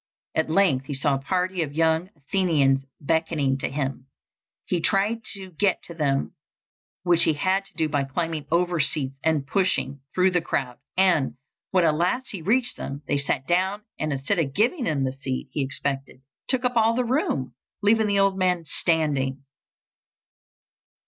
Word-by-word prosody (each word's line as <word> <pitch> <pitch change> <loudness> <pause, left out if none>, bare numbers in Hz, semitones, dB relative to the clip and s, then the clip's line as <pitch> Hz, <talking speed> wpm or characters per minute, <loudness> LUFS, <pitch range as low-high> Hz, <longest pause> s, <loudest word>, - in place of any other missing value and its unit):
At 160 0 0
length 155 -7 +2
he 145 - -3
saw 140 +1 +1
a - - +1
party 185 +4 -1
of 145 -2 -3
young 160 +2 +2
Athenians 140 -4 +1
beckoning 155 -3 0
to - - -2
him. 135 -1 -3 0.6
He 175 -2 -1
tried 210 +6 +1
to 190 -2 -8
get 190 +3 +1
to 170 - -8
them, 140 -4 0 0.7
which 175 -2 +4
he 160 - +3
had 190 +6 +1
to - - -15
do 160 -2 +1
by 145 -2 0
climbing 155 +1 -3
over 175 +1 +1
seats 140 -2 +1
and 155 -3 +1
pushing 145 -5 0
through 185 0 +4
the 180 -1 +1
crowd; 125 -6 -2 0.2
and, 180 -8 +3 0.3
when 185 -2 +3
at 155 - +4
last 185 +12 0
he 195 - -6
reached 240 +8 +1
them, 140 +2 -6
they 145 - +2
sat 140 -1 +1
down, 190 +5 +1 0.2
and, 155 -1 -1
instead 140 +8 0
of 140 -4 -1
giving 245 - +1
him 145 -4 0
the 130 -1 -1
seat 135 -1 -4
he - - -4
had 135 - -1
expected, 135 -1 -3 0.3
took 255 -1 +2
up 250 -1 +1
all 225 0 +4
the 250 0 +1
room, 235 - -1 0.3
leaving 220 +1 +4
the 200 -1 +1
old 195 -1 +3
man 180 -3 +1
standing. 145 -5 0
160 Hz, 175 wpm, -25 LUFS, 140-190 Hz, 0.7 s, which